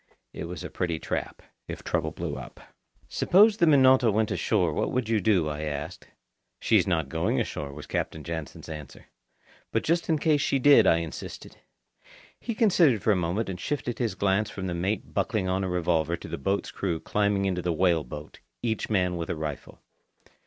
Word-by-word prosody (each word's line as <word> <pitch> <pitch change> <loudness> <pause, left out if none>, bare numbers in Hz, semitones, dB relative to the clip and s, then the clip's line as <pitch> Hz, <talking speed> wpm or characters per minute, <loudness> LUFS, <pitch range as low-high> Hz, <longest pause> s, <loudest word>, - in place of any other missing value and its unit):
It - - -5
was 90 +1 -7
a - - -7
pretty 85 -3 -2
trap, - - -4 0.2
if - - -7
trouble - - -1
blew - - -5
up. - - -9 0.5
"Suppose 205 +4 +4
the 170 - +3
Minota 130 -5 +6
went 110 +1 +1
ashore—what 90 -8 0
would 125 -3 -1
you 110 -2 +1
do?" 90 -5 +2
I 75 0 -4
asked. 75 -2 -5 0.5
"She's - - +3
not 80 -6 +1
going 80 +4 0
ashore," 70 -1 -3
was 75 +1 -9
Captain 80 - -3
Jansen's 80 -4 -6
answer. 75 -3 -9 0.7
"But 115 - 0
just 170 +1 0
in 160 - +3
case 150 -1 +2
she 140 - +1
did?" 135 -6 +6
I 80 - +5
insisted. 85 -2 -7 0.8
He 230 - -4
considered 170 - +4
for 110 - +3
a - - +4
moment 90 +5 -1
and 95 -2 -5
shifted 125 +1 -3
his 115 -6 -1
glance 100 +2 +1
from 95 -2 -6
the 90 - -2
mate 95 +4 -2
buckling 95 -4 0
on 95 +1 0
a 95 - -2
revolver 85 -2 0
to - - -10
the - - -5
boat's 95 +8 -1
crew 85 -5 -2
climbing 100 0 0
into 90 -2 0
the 90 - -1
whale 85 -1 +2
boat 75 +4 -9 0.2
each 110 -2 -1
man 90 -4 +1
with 85 -1 -4
a - - -1
rifle. 75 -2 -6
95 Hz, 190 wpm, -27 LUFS, 85-115 Hz, 0.8 s, Minota